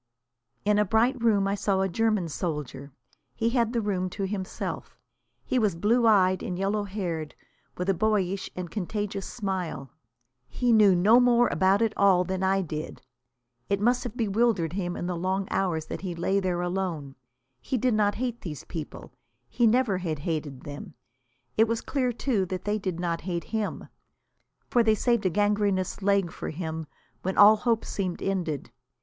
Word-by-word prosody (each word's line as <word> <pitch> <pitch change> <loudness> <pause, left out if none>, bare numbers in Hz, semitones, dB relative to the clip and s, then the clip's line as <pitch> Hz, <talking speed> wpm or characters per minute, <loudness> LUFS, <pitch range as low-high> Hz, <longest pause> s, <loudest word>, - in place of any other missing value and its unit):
In 210 0 +3
a - - +5
bright 230 +5 +2
room 205 -4 +3
I 195 - 0
saw 195 -1 0
a 190 - +2
German 215 -2 +1
soldier. 150 -4 -4 0.4
He 230 +1 0
had 235 -2 +1
the 235 -2 0
room 185 -3 -1
to 195 +2 -3
himself. 190 -1 -5 0.5
He 255 - +1
was 210 -6 +1
blue 230 +7 +3
eyed 185 -3 +4
and 180 - -4
yellow 200 +2 0
haired, 175 -6 -4 0.4
with 180 - -3
a 195 - +4
boyish 195 -1 0
and 180 -2 -5
contagious 205 0 -3
smile. 185 - -4 0.6
He 245 -1 0
knew 210 -4 +6
no 210 +7 +6
more 240 -1 +4
about 195 +3 +3
it 220 -1 +1
all 190 -3 +4
than 190 0 -3
I 190 0 +2
did. 155 -2 -6 0.7
It 200 - +1
must 245 +4 +2
have 245 -1 -6
bewildered 210 -6 +1
him 180 -2 -2
in - - -4
the 180 0 -2
long 190 +3 -1
hours 170 -5 0
that - - -6
he 180 -3 -4
lay 190 +4 +1
there 180 -2 -1
alone. 175 -6 -3 0.5
He 255 - -2
did 250 +1 +1
not 205 -1 +2
hate 240 -1 -3
these 155 -5 -6
people. 160 -4 -8 0.4
He 240 - +3
never 225 -4 +2
had 165 -4 -2
hated 145 -3 -4
them. 145 0 -9 0.6
It 220 +1 +5
was 230 0 -1
clear, 255 -4 -1
too, 230 -5 0
that 185 0 -5
they 210 +1 0
did 185 -4 -3
not 170 -1 -2
hate 175 -2 -3
him. 220 -2 -2 0.8
For 240 - +3
they 220 -1 +4
had - - -1
saved 235 -2 +1
a - - +2
gangrenous 205 -1 0
leg 195 -3 +2
for - - -6
him 160 -1 -5 0.3
when 190 +1 -3
all 210 +1 +8
hope 230 0 0
seemed 185 -3 -3
ended. 165 -10 -2
195 Hz, 180 wpm, -27 LUFS, 175-220 Hz, 0.8 s, all